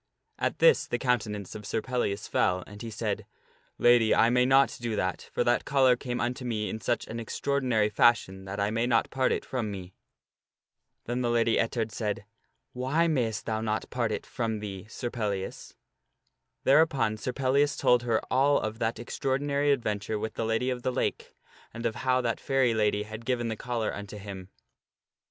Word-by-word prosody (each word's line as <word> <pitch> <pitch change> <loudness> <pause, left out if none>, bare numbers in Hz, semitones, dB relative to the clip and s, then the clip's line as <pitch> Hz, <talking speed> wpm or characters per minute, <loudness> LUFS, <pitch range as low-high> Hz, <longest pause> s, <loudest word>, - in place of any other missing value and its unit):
At - - -1
this - - +5
the 120 - -1
countenance 110 -6 -1
of 105 - -8
Sir 110 +2 -1
Pellias 110 -5 -2
fell, 90 -1 +1
and 105 0 -11
he 115 - -5
said, 110 - -3 0.3
" - - -37
Lady, 120 -2 +6
I 115 - +4
may 125 0 +3
not 135 0 +4
do 115 -2 -2
that; 95 -3 -2
for - - +1
that - - +2
collar 130 -3 +4
came 125 0 -4
unto 125 +2 -2
me 110 -4 -2
in 110 - -5
such 120 +5 -1
an 115 - -6
extraordinary 125 -2 0
fashion 105 -3 +2
that 95 +1 -5
I 100 +1 +1
may 115 +2 0
not 115 -2 +2
part 130 -1 +1
it - - -1
from 120 -5 -2
me." 95 -2 -7 1.1
Then 120 +2 -2
the 120 - 0
Lady 115 -1 +2
Ettard 115 -1 -1
said, 105 -2 -3 0.2
" - - -50
Why 160 +6 +2
mayst 120 - 0
thou 110 -1 -1
not 110 -1 -2
part 120 -3 0
it - - -3
from 115 -3 -2
thee 100 -1 -7
Sir 120 +1 -4
Pellias?" 100 -5 -4 0.9
Thereupon 140 -6 +4
Sir 120 +4 -3
Pellias 140 +3 +1
told 125 -1 +4
her 115 -2 +1
all 140 +3 +4
of 110 +1 -4
that 115 0 -1
extraordinary 140 +4 0
adventure 105 -5 -1
with 110 +1 -4
the 115 - -2
Lady 115 +3 0
of 125 -1 -3
the 130 - 0
Lake, - - -2 0.4
and 115 +1 -5
of 115 0 -1
how 130 -1 +2
that 115 -2 -1
fairy 135 -4 +2
lady 105 -1 +1
had 110 +2 -8
given 120 -1 -1
the 110 - -2
collar 115 -1 -2
unto 105 0 -7
him. 95 -2 -8
115 Hz, 190 wpm, -28 LUFS, 105-125 Hz, 1.1 s, Lady